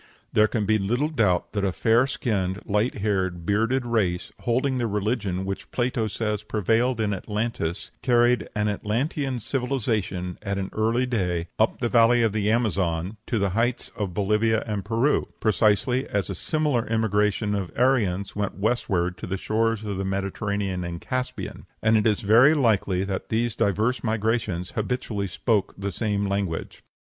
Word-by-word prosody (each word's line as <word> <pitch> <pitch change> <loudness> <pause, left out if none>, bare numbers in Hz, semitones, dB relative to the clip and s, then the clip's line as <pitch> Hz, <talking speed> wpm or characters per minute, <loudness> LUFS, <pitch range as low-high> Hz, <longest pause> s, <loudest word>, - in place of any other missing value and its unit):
There 105 0 +5
can 110 -1 -1
be 110 +1 +2
little 120 +10 0
doubt 105 - +1
that 100 -2 -1
a 95 - +2
fair 115 +7 +3
skinned, 100 -7 -2
light 105 +4 +1
haired, 95 -4 -1
bearded 115 +6 +1
race, 100 -7 0
holding 130 +2 0
the 120 - 0
religion 105 -3 -1
which 95 0 -5
Plato 120 -2 0
says 105 0 -2
prevailed 115 +3 +1
in 105 -2 +1
Atlantis, 105 -3 -3
carried 120 -2 +3
an 105 0 +1
Atlantean 125 +6 -1
civilization 110 -8 -2
at 100 -1 -2
an 95 -1 -3
early 115 +3 +1
day 90 -8 -1
up 110 - +2
the 120 - -1
valley 120 0 +5
of 110 -3 +2
the 105 -1 0
Amazon 100 -4 0
to 120 - 0
the 100 -2 +1
heights 115 +5 0
of 100 -5 -3
Bolivia 105 +3 +2
and 105 -3 -3
Peru, 115 +8 +1
precisely 110 +4 +2
as 100 -1 -1
a - - -2
similar 145 - 0
emigration 105 -1 +1
of 100 -4 -2
Aryans 105 -7 +1
went 105 -1 -2
westward 95 -5 0
to - - -6
the 95 +2 -2
shores 115 +2 0
of 100 -2 -3
the 95 - -2
Mediterranean 95 0 -2
and 85 -1 -5
Caspian, 130 +5 -4 0.2
and 110 0 +4
it 110 0 +3
is 105 -2 +1
very 120 +9 +6
likely 100 -8 +2
that 95 -1 -4
these 115 0 0
diverse 110 +6 +1
migrations 110 -5 -1
habitually 110 -3 -2
spoke 105 +1 0
the 100 +1 -3
same 100 0 -1
language. 100 -4 -3
105 Hz, 165 wpm, -25 LUFS, 100-115 Hz, 0.2 s, very